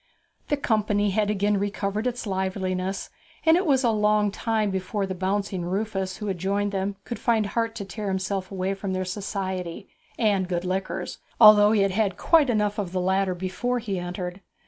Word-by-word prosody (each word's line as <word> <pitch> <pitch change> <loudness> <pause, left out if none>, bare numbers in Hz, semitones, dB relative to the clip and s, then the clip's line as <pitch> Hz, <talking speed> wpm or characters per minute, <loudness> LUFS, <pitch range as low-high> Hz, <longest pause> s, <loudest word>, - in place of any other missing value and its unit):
The 290 - +1
company 210 -5 +1
had 210 +1 +1
again 205 0 +1
recovered 205 +2 -2
its 245 -1 -3
liveliness, 190 -1 -2 0.3
and 320 0 +7
it 360 0 +1
was 270 -2 +3
a 235 - +4
long 210 -1 +2
time 215 -1 0
before 190 +2 -2
the 190 - -4
bouncing 190 0 -1
Rufus 190 +1 -2
who 210 - -6
had 190 -4 -2
joined 200 +2 0
them 195 0 -2
could 235 - -6
find 225 -3 +2
heart 230 +2 -1
to 200 - -5
tear 205 +2 -5
himself 190 0 -2
away 190 0 -2
from 195 -1 -4
their 185 0 -1
society 190 -2 -4 0.3
and 200 -5 +2
good 175 0 -1
liquors, 185 -1 -3 0.2
although 210 -1 +8
he 215 -2 +3
had 195 -1 +2
had 195 -2 0
quite 315 -5 +4
enough 210 -2 +1
of 185 -3 -3
the 185 - 0
latter 190 0 +1
before 190 +8 -2
he 205 -6 -3
entered. 180 +1 -5
200 Hz, 190 wpm, -25 LUFS, 190-215 Hz, 0.3 s, although